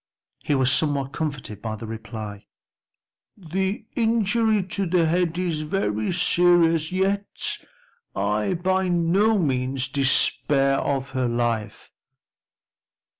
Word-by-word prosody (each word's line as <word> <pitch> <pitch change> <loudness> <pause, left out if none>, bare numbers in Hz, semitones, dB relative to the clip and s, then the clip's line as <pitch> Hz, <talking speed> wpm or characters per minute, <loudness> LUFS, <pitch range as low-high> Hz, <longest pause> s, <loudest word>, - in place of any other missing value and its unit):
He 145 - -1
was 130 -1 +3
somewhat 140 -3 +1
comforted 140 - -5
by 110 -1 -4
the 110 - -8
reply, 110 -2 -8 0.9
"The 190 +4 -3
injury 225 -2 +2
to 190 +1 -2
the 170 -1 +2
head 170 +1 0
is 170 -4 -1
very 110 - -1
serious, 170 -2 +3
yet 195 +2 -1 0.6
I 105 - 0
by 185 +2 0
no 180 +5 +2
means 130 -5 -1
despair 135 0 +2
of 135 -1 -2
her 130 -2 -1
life." 120 -2 -2
155 Hz, 110 wpm, -23 LUFS, 130-185 Hz, 0.9 s, was